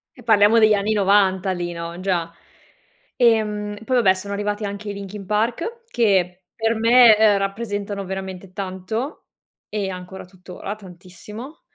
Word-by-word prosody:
E 245 - -15
parliamo 220 0 +5
degli 215 -1 +5
anni 205 +1 +1
90 195 -2 +3
lì, 175 -1 -3
no, 170 +1 -6
già. 180 -3 -1 0.8
Ehm, 210 -3 +1
poi 255 +3 0
vabbè 200 -6 +5
sono 200 +2 -6
arrivati 205 +1 -2
anche 200 +1 -6
i - - -3
Linkin 200 0 -8
Park 235 - -1
che, 190 - +1
per 225 0 0
me, 230 0 +7
ehm, 215 -2 +5
rappresentano 200 0 -3
veramente 190 0 -7
tanto 195 - -5 0.4
e 205 -2 -2
ancora 185 0 -8
tuttora 185 +2 -8
tantissimo. 205 - -11
200 Hz, 145 wpm, -21 LUFS, 190-220 Hz, 0.8 s, me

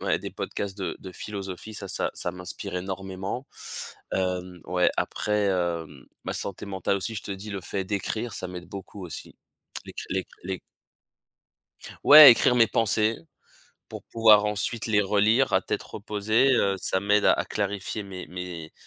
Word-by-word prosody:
ouais - - +1
des - - -6
podcasts 100 -1 -4
de 95 - -3
de 95 -1 -10
philosophie, 100 +2 -7
ça 100 - -6
ça - - 0
ça - - -2
m'inspire 90 0 -7
énormément. 95 +5 -5 0.7
Hem, 90 -1 -2
ouais 90 0 +2
après, 105 -1 0
hem, 85 -7 -2 0.2
ma - - -3
santé 100 +1 -5
mentale 95 0 -1
aussi 110 +4 -4
je 105 - -5
te - - -7
dis 100 +2 -8
le 100 -1 -4
fait 95 +2 -3
d'écrire 110 +4 -3
ça 90 - -4
m'aide 90 -1 -8
beaucoup 100 0 -8
aussi. 80 - -9 0.5
L'écri - - -8
l'é 95 -1 -1 0.2
l'é 95 -1 -4 1.4
Ouais 150 -1 +12
écrire 125 +1 +4
mes 115 -2 +5
pensées 110 0 +2 0.7
pour - - -9
pouvoir 110 -2 +5
ensuite 105 +2 -1
les 105 -2 +3
relire 105 +6 +3
à - - +4
tête - - -3
reposée, 110 +5 +1
heu, 100 -5 +2
ça 95 +1 -1
m'aide 105 +1 +2
à - - +7
à - - 0
clarifier 100 +1 -3
mes 95 -2 -8
mes 90 -3 -7
100 Hz, 165 wpm, -26 LUFS, 90-105 Hz, 1.4 s, Ouais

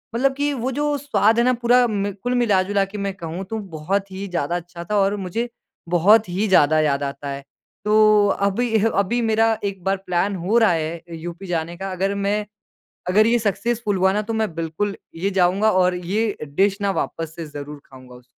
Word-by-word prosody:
मतलब 270 +2 +2
कि 290 0 0
वो 260 +1 -2
जो 290 +2 0
स्वाद 235 -5 +2
है - - +4
ना 255 - +4
पूरा 245 +1 +5
म 200 -1 -1
कुल 250 0 0
मिला-जुला 200 -4 +2
के 200 +2 -9
मैं 200 -1 -2
कहूँ 170 +2 -6
तो 220 0 -3 0.2
बहुत 195 +5 -2
ही 195 +1 -5
ज़्यादा 170 -2 -2
अच्छा 175 0 -6
था 210 - +2
और 200 +1 +2
मुझे 215 +6 -3 0.4
बहुत 200 +4 +4
ही 200 +5 -1
ज़्यादा 155 -4 +4
याद 145 -2 +1
आता 140 0 -5
है। 140 0 -6 0.4
तो 215 -1 +5
अभी-अभी 220 +2 +1
मेरा 225 0 +2
एक 195 -3 -4
बार 195 0 +1
प्लान 180 +3 0
हो 220 +5 +3
रहा 225 -6 +5
है 165 0 -2
यूपी 175 +3 -8
जाने 170 0 -3
का। 195 0 -5
अगर 195 +2 -1
मैं 205 +1 -1 0.6
अगर 215 +4 +4
ये 240 +1 +3
सक्सेसफुल 215 0 -1
हुआ 190 +1 +3
ना 210 +1 0
तो 225 - -1
मैं 220 -7 -1
बिल्कुल 165 +5 -3 0.2
ये 195 +4 -1
जाऊँगा 190 +3 +3
और 180 -1 +3
ये 200 +5 -1
डिश 195 +8 0
ना 200 - +1
वापस 165 -1 -6
से 165 -2 -6
ज़रूर 145 0 -8
खाऊँगा 130 -1 -15
उसको। 125 0 -15
195 Hz, 200 wpm, -21 LUFS, 175-220 Hz, 0.6 s, पूरा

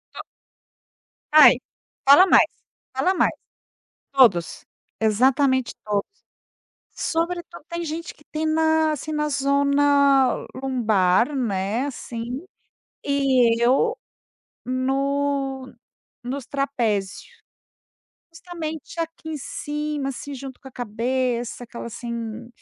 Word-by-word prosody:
To - - -6 1.1
Ai, 310 0 +8 0.5
fala 290 +7 +9
mais, - - +6 0.5
fala 275 +9 +1
mais. - - +2 0.8
Todos! 215 -11 +3 0.4
Exatamente 260 +4 +2
todos. 205 -1 0 0.9
Sobretudo 345 0 -3
tem 340 0 -4
gente 330 +2 -5
que 295 - -23
tem 315 0 -1
na, 315 0 +2
assim, 310 +2 -5
na 300 0 0
zona 280 -1 +3
lombar, 235 -3 +1
né, 215 +1 -1
assim, 240 +3 -6 0.6
e 260 -5 +3
eu 275 - +3 0.7
no 270 +1 -1 0.5
nos 260 +1 -5
trapézio. 235 -9 -1 1.1
Justamente 330 -2 -7
aqui 325 -1 -6
em 310 - -3
cima, 295 0 -4
assim, 285 +2 -7
junto 265 -1 -9
com 265 - -11
a - - -16
cabeça, 245 +1 -2
aquela, 235 0 -8
assim, 235 0 -6
270 Hz, 100 wpm, -23 LUFS, 240-300 Hz, 1.1 s, fala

